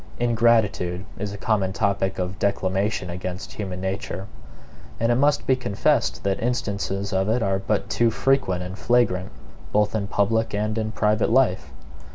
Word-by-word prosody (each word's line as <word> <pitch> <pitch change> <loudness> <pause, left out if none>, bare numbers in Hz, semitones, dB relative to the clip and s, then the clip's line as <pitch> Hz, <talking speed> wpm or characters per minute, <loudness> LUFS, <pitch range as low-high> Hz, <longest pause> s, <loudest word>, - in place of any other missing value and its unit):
Ingratitude 110 -6 +2
is 105 0 -3
a 100 - -6
common 100 -3 0
topic 100 -2 0
of 90 +1 -3
declamation 95 -1 0
against 90 +2 -5
human 95 -3 -5
nature; 95 0 -4 0.7
and 115 +1 +2
it - - +3
must 145 +3 +2
be 130 - +4
confessed 100 -6 0
that 100 -1 -1
instances 100 -4 -2
of 95 +2 +1
it 115 +1 +1
are 95 0 +1
but 100 +2 -1
too 120 -1 +2
frequent 120 -6 +1
and 95 +2 -7
flagrant, 120 -7 +2 0.4
both 105 0 +2
in 105 -3 -1
public 105 +2 +1
and 105 +1 -1
in 110 0 -2
private 105 0 +1
life. 115 -6 +2
100 Hz, 160 wpm, -24 LUFS, 95-115 Hz, 0.7 s, be